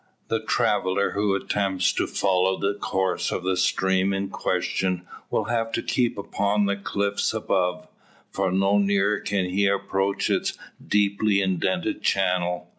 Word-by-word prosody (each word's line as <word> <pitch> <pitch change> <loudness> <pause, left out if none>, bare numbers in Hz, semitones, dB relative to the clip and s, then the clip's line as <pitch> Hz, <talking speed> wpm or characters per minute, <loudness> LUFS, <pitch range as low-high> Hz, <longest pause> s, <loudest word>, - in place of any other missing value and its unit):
The - - +1
traveller 95 +2 +1
who 100 -1 +1
attempts 95 -1 0
to - - -1
follow 95 -1 +1
the 100 +1 0
course 95 -2 -1
of 90 - -3
the 95 0 +1
stream 95 +1 +1
in 95 0 -2
question 90 -2 -1 0.2
will - - 0
have 115 -1 -1
to - - -1
keep 120 -4 0
upon 100 +1 0
the 100 0 +1
cliffs 100 +1 -1
above: 90 -4 -1 0.4
for 95 -1 0
no 95 +2 +3
nearer 100 +1 +2
can 100 -2 -1
he 95 +2 +1
approach 100 0 0
its - - 0 0.3
deeply 100 0 +2
indented 95 -1 -1
channel. 90 -3 0
95 Hz, 145 wpm, -24 LUFS, 95-100 Hz, 0.4 s, no